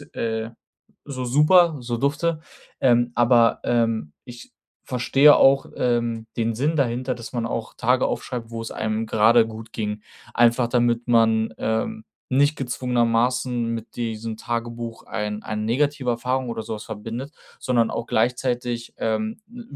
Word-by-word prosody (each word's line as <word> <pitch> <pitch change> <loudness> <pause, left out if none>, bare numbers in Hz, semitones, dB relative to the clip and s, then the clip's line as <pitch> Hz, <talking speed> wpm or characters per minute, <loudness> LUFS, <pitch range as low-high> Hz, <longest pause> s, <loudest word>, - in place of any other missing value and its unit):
äh, 110 0 -2 0.5
so 130 -3 -5
super, 155 +6 +4
so 120 -1 -3
dufte.“ 150 +5 0 0.4
Ähm, 120 -1 +3
aber, 120 -1 +4
ähm, 115 -9 0
ich 120 -2 -12 0.3
verstehe 135 +4 +5
auch, 135 0 +5
ähm, 120 -2 0
den 115 -1 0
Sinn 150 +7 0
dahinter, 130 -1 0
dass 115 -1 -9
man 120 -2 -2
auch 115 -1 -4
Tage 125 +2 +2
aufschreibt, 120 -3 -4
wo 115 -1 -5
es 115 - -6
einem 110 +1 -2
grade 110 +1 +4
gut 110 0 -10
ging. 105 -1 -4 0.3
Einfach, 120 0 +3
damit 120 0 +1
man, 110 -1 +3
ähm, 220 - -2 0.2
nicht 145 +3 +2
gezwungenermaßen 125 -1 0
mit 115 -1 -6
diesem 115 -1 -4
Tagebuch 115 0 -5
ein 105 0 -4
eine 105 0 -4
negative 130 +2 0
Erfahrung 125 +1 -1
oder 115 -1 -4
so 110 - -5
was 105 - -8
verbindet, 115 +6 -6 0.3
sondern 120 -3 +1
auch 115 - -4
gleichzeitig, 120 0 -1
ähm, 110 - -2
w 240 +2 -11
120 Hz, 145 wpm, -23 LUFS, 115-125 Hz, 0.5 s, verstehe